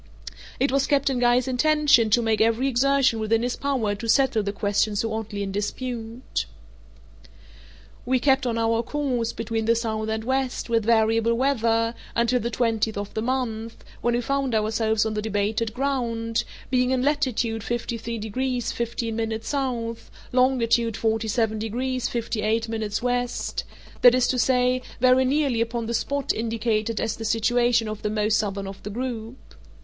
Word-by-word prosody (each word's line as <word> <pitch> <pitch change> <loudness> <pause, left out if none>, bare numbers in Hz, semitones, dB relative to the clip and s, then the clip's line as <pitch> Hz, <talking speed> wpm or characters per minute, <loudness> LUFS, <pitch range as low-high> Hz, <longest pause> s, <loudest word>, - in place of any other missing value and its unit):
It 270 +2 +2
was 275 0 +2
Captain 275 -3 +1
Guy's 245 +1 +3
intention 280 -3 +4
to 235 +3 +3
make 220 -1 +1
every 230 +4 +2
exertion 270 -2 +2
within 225 +1 +1
his 245 0 -1
power 260 -7 -1
to 225 +3 -6
settle 265 -2 +3
the 200 -1 -2
question 205 +1 0
so 220 +2 -1
oddly 215 -2 -4
in 195 - -4
dispute. 230 +4 -4 0.8
{*3} - - -19 0.8
We 255 0 +2
kept 265 0 +2
on 230 -1 -1
our 230 0 +2
course, 250 -4 -1
between 225 -1 -3
the 230 +1 +3
south 220 -1 -2
and 220 0 -2
west, 260 -1 -2
with 225 -2 +2
variable 225 0 +3
weather, 230 -3 +1 0.2
until 235 +2 +2
the 235 - -2
twentieth 225 -2 0
of 205 0 -5
the 220 - -2
month, 230 -2 -3 0.2
when 240 0 +1
we 240 - 0
found 275 -1 -1
ourselves 220 0 +1
on 220 - -1
the 210 - -2
debated 215 +1 -1
ground, 235 -3 -1 0.3
being 250 -1 +2
in 255 -1 +1
latitude 255 -6 0
53 235 -1 -3
degrees 245 +3 -2
15' 230 -1 -3
S., 220 +4 -4 0.8
longitude 235 -3 +2
47 220 0 0
degrees 250 +4 -2
58' 225 -1 -1
W.—that 245 +2 0
is 255 -1 +3
to 255 - 0
say, 250 +1 +2 0.2
very 255 +1 +5
nearly 270 -3 +1
upon 230 0 -2
the 235 - -3
spot 280 +4 -1
indicated 225 -1 -1
as 225 - -2
the 225 - -6
situation 230 +1 +2
of 215 -1 -5
the 210 - -1
most 215 0 +1
southern 200 -2 -2
of 195 0 -8
the 210 - -6
group. 235 +1 -5
230 Hz, 160 wpm, -24 LUFS, 220-250 Hz, 0.8 s, very